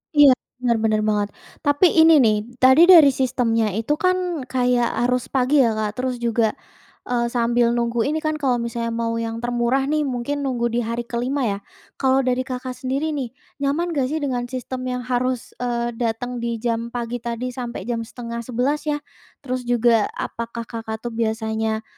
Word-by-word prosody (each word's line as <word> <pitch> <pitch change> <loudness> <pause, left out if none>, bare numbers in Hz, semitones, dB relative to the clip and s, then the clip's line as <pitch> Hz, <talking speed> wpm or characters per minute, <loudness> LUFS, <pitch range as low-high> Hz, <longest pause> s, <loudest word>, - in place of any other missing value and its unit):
Iya, 290 -2 +8 0.3
benar 235 -2 +3
benar 215 -1 +2
banget. 205 -1 0 0.3
Tapi 290 +4 +4
ini 320 -4 +6
nih 215 -2 +4 0.3
tadi 265 +7 +7
dari 320 -7 +9
sistemnya 235 -4 +1
itu 225 +7 0
kan 360 -7 0
kayak 250 -2 +2 0.2
harus 250 0 0
pagi 270 +2 +2
ya 230 -4 +3
Kak 215 -1 -1
terus 255 0 -1
juga, 230 -2 +1 0.5
eee, 240 -1 0
sambil 235 0 +2
nunggu 235 0 0
ini 310 +2 0
kan 310 0 0
kalau 265 -4 +2
misalnya 235 0 -3
mau 230 0 -1
yang 230 +1 -4
termurah 240 +2 +1
nih 305 -2 +1
mungkin 255 +3 -2
nunggu 240 -3 -1
di 240 - 0
hari 235 +1 -2
ke-5 250 +4 -2
ya, 200 -3 -1 0.4
kalau 265 0 +3
dari 255 +1 0
Kakak 255 0 -4
sendiri 275 +5 -1
nih 270 -5 -3 0.3
nyaman 305 +5 0
gak 275 -5 0
sih 310 +3 -2
dengan 245 -3 -1
sistem 255 0 -5
yang 250 -1 -3
harus, 250 0 -1
eee, 240 -1 -1
datang 240 +1 -2
di 235 0 -2
jam 230 -1 -1
pagi 240 0 -4
tadi 235 +2 -4
sampai 240 -5 -6
jam 235 +1 -2
10:30 245 +5 -3
ya? 295 0 -1 0.4
Terus 255 -2 -4
juga 235 -3 +3
apakah 235 0 -5
Kakak 225 -1 -6
tuh 240 - -4
biasanya, 220 -1 -1
245 Hz, 175 wpm, -22 LUFS, 235-265 Hz, 0.5 s, dari